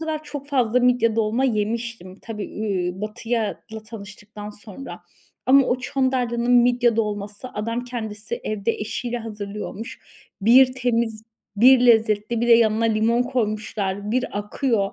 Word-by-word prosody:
kadar 315 -1 -3
çok 290 -1 -7
fazla 250 -3 +2
midye 245 -3 +2
dolma 225 +4 +1
yemiştim. 225 -4 -2
Tabii, 215 -3 -5
iii, 190 -4 -3
Batı'yla 225 +1 -2 0.3
tanıştıktan 210 -1 -10
sonra 210 +5 -10 0.5
ama 270 0 +6
o 250 - +1
Çandarlı'nın 250 -2 0
midye 245 -1 +4
dolması 210 +1 -3
adam 230 +3 -3
kendisi 220 -4 -5
evde 215 +1 -1
eşiyle 235 +3 -4
hazırlıyormuş. 210 +1 -7 0.4
Bir 255 +5 +6
temiz, 235 -3 -1 0.3
bir 255 +4 +7
lezzetli 220 0 +3
bir 240 - 0
de - - +7
yanına 230 -1 +4
limon 225 +2 +2
koymuşlar. 210 -5 -2
Bir 250 -3 -1
akıyor. 210 -1 -1
230 Hz, 130 wpm, -23 LUFS, 210-245 Hz, 0.5 s, bir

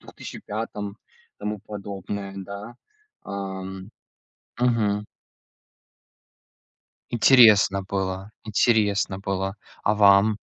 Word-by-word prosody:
2005 105 -1 -6
году, 100 - -9 0.4
тому 105 +1 -3
подобное, 100 -1 -6
да. 100 +4 -8 0.5
Ам, 95 0 -6 0.7
мгм. 105 -4 +1 2.0
Интересно 110 -5 +6
было 95 +1 -3
интересно 105 -3 +2
было. 95 0 -3 0.3
А 105 - +2
вам? 100 +1 +5
100 Hz, 75 wpm, -24 LUFS, 95-105 Hz, 2.0 s, Интересно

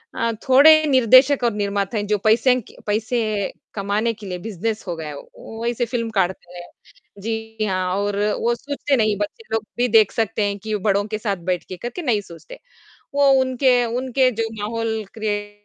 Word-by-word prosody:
अ, 230 0 0 0.2
थोड़े 310 +4 +7
निर्देशक 260 +1 +5
और 235 -3 +2
निर्माता 200 +1 -2
हैं 205 0 -2
जो 210 0 +1
पैसे 235 +4 +4
क - - -18
पैसे 215 -1 -1 0.2
कमाने 205 +3 -1
के 210 -1 -12
लिए 180 -1 -4
बिज़नेस 220 +2 -4
हो 175 - -3
गया 160 -1 -7
है 150 - -6
वो, - - -12
वो 225 +1 -8
ऐसी 240 0 0
फिल्म 230 -1 -3
काढ़ते 180 -3 -2
हैं। 175 - -9 0.6
जी 225 -1 -3
हाँ 185 -2 -1
और 200 0 -1 0.2
वो 235 +1 +1
सोचते 285 +2 -2
नहीं 215 -2 +2
बच्चे 205 - -5
लोग 220 -1 0
भी 245 +1 +2
देख 220 -3 +5
सकते 225 -1 -1
हैं 200 0 -2
कि 215 +1 -3
बड़ों 200 0 +2
के 215 - -1
साथ 205 -3 -2
बैठ 180 - -2
के 185 - -6
करके 240 - -6
नहीं 230 -8 +1
सोचते। 200 - -13 0.6
वो 280 -1 +4
उनके 255 -1 +2
उनके 255 0 +2
जो 225 - -2
माहौल 220 0 -2
क्रीऐट 205 -1 -4
220 Hz, 190 wpm, -21 LUFS, 205-240 Hz, 0.6 s, थोड़े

